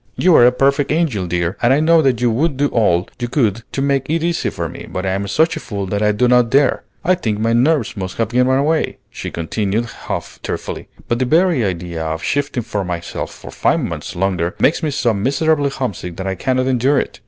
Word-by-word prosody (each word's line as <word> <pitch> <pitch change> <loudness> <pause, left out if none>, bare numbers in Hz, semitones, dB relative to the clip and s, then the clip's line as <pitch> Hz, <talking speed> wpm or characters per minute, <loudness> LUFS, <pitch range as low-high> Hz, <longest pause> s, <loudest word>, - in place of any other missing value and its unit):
You 180 -2 +4
are 120 - +7
a - - +5
perfect 140 +2 +1
angel, 145 - 0
dear, 85 +2 -1
and 120 - +4
I 135 - +4
know 165 +1 +5
that 130 -5 +2
you 120 -1 +3
would 140 +4 0
do 145 +1 +2
all 95 -6 +2
you 120 - -2
could 115 -4 0
to 135 - -2
make 140 -1 0
it 165 +1 0
easy 170 0 0
for - - -4
me, - - -9
but 95 - -4
I 95 - 0
am 100 +1 -2
such 160 - +2
a - - -4
fool 100 -8 -4
that 100 +2 -2
I 105 0 +3
do 105 +4 +2
not 125 -1 +4
dare. 140 +2 +3 0.2
I 185 - +4
think 115 - -1
my 115 +2 +1
nerves 130 +1 +2
must 95 -2 -5
have 115 -2 0
given 130 +3 +2
way," 155 +1 0
she - - -6
continued 100 +6 -2
half 115 - -6
tearfully; - - -5 0.2
"but 120 - 0
the 130 - +1
very 165 -1 +3
idea 85 -4 -3
of 80 0 -3
shifting 140 - -1
for 105 -3 -3
myself 85 -2 -4
for - - -11
five - - +1
months - - -5
longer 90 -2 -1
makes 160 - +2
me 155 - 0
so 135 -5 +1
miserably 140 +7 +1
homesick 105 -10 -4
that 95 - -5
I 95 - -1
cannot 130 +7 0
endure 130 +2 +2
it. - - -5
120 Hz, 235 wpm, -18 LUFS, 100-145 Hz, 0.2 s, are